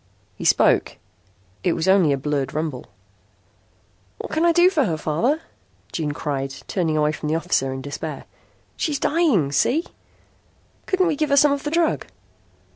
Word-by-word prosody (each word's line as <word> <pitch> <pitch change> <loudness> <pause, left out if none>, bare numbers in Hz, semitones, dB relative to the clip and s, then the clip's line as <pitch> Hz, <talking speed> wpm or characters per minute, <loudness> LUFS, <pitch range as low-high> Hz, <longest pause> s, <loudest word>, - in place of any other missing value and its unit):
He - - -7
spoke. - - +3 0.7
It 175 - +2
was 165 +2 -2
only 190 -5 +4
a 140 - +1
blurred 140 0 -2
rumble. 155 -5 -3 1.3
"What - - -7
can 315 - 0
I 340 - +5
do 345 +1 +5
for 300 -7 +2
her, 160 -3 -1
Father?" 230 - 0 0.5
June 155 -3 -2
cried, 140 -2 -3 0.2
turning 165 -5 0
away 150 0 +2
from 150 0 -5
the 155 - +1
officer 165 -5 0
in 130 0 -6
despair. 145 +1 -6 0.5
"She's 300 -3 -1
dying. 280 - +2
See? 290 - +1 1.0
Couldn't 375 -1 +2
we 325 -4 +1
give 305 +1 -1
her 280 - +3
some 295 +1 +6
of 280 0 -1
the 295 - -3
drug?" 330 0 0
170 Hz, 165 wpm, -22 LUFS, -, 1.3 s, some